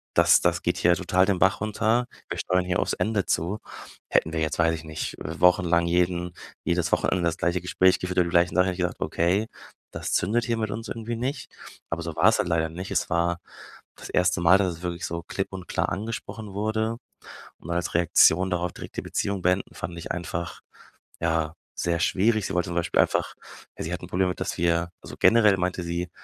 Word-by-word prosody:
das - - +6
das - - +1
geht - - 0
hier 85 0 +4
total 90 +3 +2
den 95 -2 0
Bach 95 +3 +3
runter. 110 +3 +1 0.2
Wir - - -3
steuern 90 0 +1
hier 90 -1 0
aufs - - 0
Ende 105 -3 0
zu.“ 95 +6 -1 0.5
Hätten 80 - +2
wir 80 - -1
jetzt- 80 +1 -1
weiß 80 0 +3
ich 80 - -8
nicht- 80 0 -5
äh, 80 +1 -6
wochenlang 85 -1 +4
jeden 90 0 0 0.3
jedes 85 -1 0
Wochenende 90 - +1
das 85 -1 0
gleiche 85 +1 0
Gespräch 90 +1 +3
geführt 90 0 -4
über 90 - +4
die 85 - -3
gleichen 85 0 +3
Sachen, 90 0 +5
hätte 90 - 0
ich 90 - -12
gesagt, 90 0 -2
okay, 95 +6 +1 0.4
das - - -5
zündet 110 +6 +1
hier 115 -2 0
mit 110 -2 -2
uns 115 +2 -5
irgendwie 115 +1 -4
nicht. 130 +5 -4 0.4
Aber 85 0 -3
so 80 -1 -5
war's 105 +7 +4
halt - - +1
leider 80 -1 +1
nicht. 90 +4 -7
Es - - 0
war 85 0 +1 0.6
das - - -10
1. 90 -1 +2
Mal, 90 +3 +6
dass 95 -3 +1
es - - -16
wirklich 85 -1 -3
so 85 0 -4
klipp 95 - -4
und 95 -1 -7
klar - - -1
angesprochen 105 -1 -5
wurde 110 +2 -1 0.6
und 85 - -10
als 85 -1 -2
Reaktion 85 +2 +4
darauf 90 -1 -1
direkt - - -10
die - - -1
Beziehung 100 -2 -2
beenden, 90 +2 0
fand 85 +1 -6
ich - - -4
einfach, 85 0 -5 0.6
ja, 80 -1 0 0.2
sehr 85 -1 -1
schwierig. 105 +4 +2
Sie - - -5
wollte 90 - +1
zum 85 - -4
Beispiel 85 0 +2
einfach - - 0 0.4
ja, - - -4
sie 80 - -4
hat 90 - -3
'n 90 - -8
Problem 90 +1 +1
damit, 90 - -3
dass - - -2
wir 85 +1 +1
also, - - -10
generell 105 -4 +5
meinte 90 0 -1
sie 85 +1 -3
90 Hz, 215 wpm, -25 LUFS, 85-100 Hz, 0.6 s, das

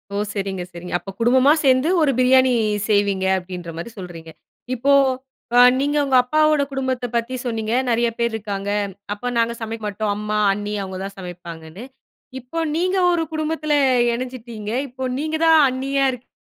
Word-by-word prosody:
ஓ! - - -1 0.2
சரிங்க 195 -3 -3
சரிங்க. 175 +1 -9
அப்போ 195 +3 -9
குடும்பமா 255 +4 +4
சேந்து 265 +4 +3
ஒரு 285 -3 +3
பிரியாணி 260 0 +5 0.4
செய்வீங்க, 200 -2 +2
அப்டின்ற 180 -2 -7
மாரி 170 +8 -6
சொல்றீங்க. 165 -3 -9 0.4
இப்போ 270 +4 +1 0.7
அ - - +8 0.2
நீங்க 290 +2 0
உங்க 265 -1 +1
அப்பாவோட 305 +2 +3
குடும்பத்தைப் 260 -3 -3
பத்தி 235 +2 -1
சொன்னீங்க. 225 -2 -2 0.2
நெறைய 235 0 +2
பேர் 235 0 0
இருக்காங்க. 205 -2 -4 0.4
அப்ப 245 +4 -4
நாங்க 230 0 +1
சமைக்க 225 0 -5
மாட்டோம். 210 0 -2
அம்மா, 210 0 -2 0.2
அண்ணி 205 +1 -4
அவுங்க 190 -1 -6
தான் 195 0 -6
சமைப்பாங்கன்னு. 175 +1 -9 0.6
இப்போ 255 +7 -9 0.2
நீங்க 365 +3 0
ஒரு 335 -2 +1
குடும்பத்தில 310 -1 -1 0.4
இணஞ்சுட்டீங்க. 235 -4 -6 0.2
இப்போ 260 +1 -8 0.2
நீங்க 315 +1 -2
தான் 320 -1 +6
அண்ணியா 270 +1 0
இருக் 250 0 -11
235 Hz, 155 wpm, -21 LUFS, 200-265 Hz, 0.7 s, அ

